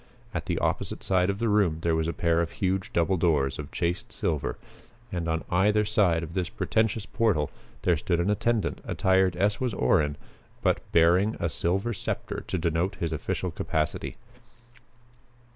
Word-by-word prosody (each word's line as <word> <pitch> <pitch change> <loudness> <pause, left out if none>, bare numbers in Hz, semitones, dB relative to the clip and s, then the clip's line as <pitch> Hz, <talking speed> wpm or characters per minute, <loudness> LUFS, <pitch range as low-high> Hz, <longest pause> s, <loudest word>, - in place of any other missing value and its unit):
At - - -3
the - - 0
opposite - - -1
side 90 -1 +2
of 100 - -1
the 115 - 0
room 100 -7 +3
there 85 -1 +1
was 80 0 0
a - - 0
pair 85 -1 +1
of 85 - -3
huge 95 0 -1
double 85 +3 +2
doors 75 -6 +1
of 70 -2 -6
chased 90 +7 -2
silver 75 -4 -2 0.5
and 85 -2 -2
on 80 0 -1
either 105 +4 +3
side 95 -6 +2
of 80 0 -7
this 90 -2 -1
pretentious 110 -1 0
portal 105 -10 +1 0.3
there 90 - +4
stood 85 +3 0
an 90 +4 +2
attendant 110 -2 0
attired 95 -2 +2
as 105 +5 +1
was 125 -6 0
Orrin, 75 +2 +2 0.5
but - - +2
bearing 90 +6 +4
a 85 - 0
silver 95 +9 -1
scepter - - -4
to - - -1
denote 85 +2 0
his 85 -1 -3
official 80 - -2
capacity. 75 -1 -2
90 Hz, 170 wpm, -27 LUFS, 80-100 Hz, 0.5 s, there